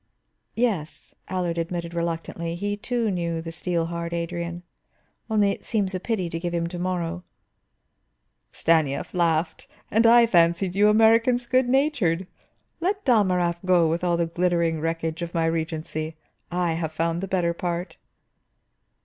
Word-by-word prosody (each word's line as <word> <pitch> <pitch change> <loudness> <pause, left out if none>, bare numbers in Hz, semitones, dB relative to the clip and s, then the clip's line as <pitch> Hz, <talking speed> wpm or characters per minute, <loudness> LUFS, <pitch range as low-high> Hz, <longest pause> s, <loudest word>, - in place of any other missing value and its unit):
"Yes," 205 -10 -2 0.2
Allard 175 -2 -1
admitted 170 0 -3
reluctantly, 170 0 -3
he 205 +3 -2
too 230 +1 -1
knew 170 -2 -2
the 165 0 -6
steel 170 0 -1
hard 170 0 -4
Adrian. 170 0 -4 0.7
"Only, 210 -2 +3
it - - -6
seems 200 -4 -1
a 185 - -2
pity 190 -3 -2
to 165 0 -4
give 175 0 -3
him 170 0 0
to 175 0 -6
morrow." 180 -1 -2 1.3
Stanief 155 -4 +1
laughed. 165 -2 0 0.2
"And 225 +3 +4
I 235 0 +7
fancied 175 -2 +3
you 205 +2 +4
Americans 230 +3 +4
good 255 0 +2
natured! 245 - +1 0.5
Let 395 +4 -1
Dalmorov 185 - +3
go 180 -3 +4
with 165 +2 -1
all 175 -1 +2
the 170 - +1
glittering 170 -1 0
wreckage 165 0 -2
of 170 0 -5
my 165 -1 +2
regency. 160 -1 -2 0.3
I 175 -1 0
have 160 -1 -3
found 165 +2 -1
the 195 - -3
better 180 -3 +1
part." 175 +1 -4
175 Hz, 150 wpm, -25 LUFS, 165-200 Hz, 1.3 s, I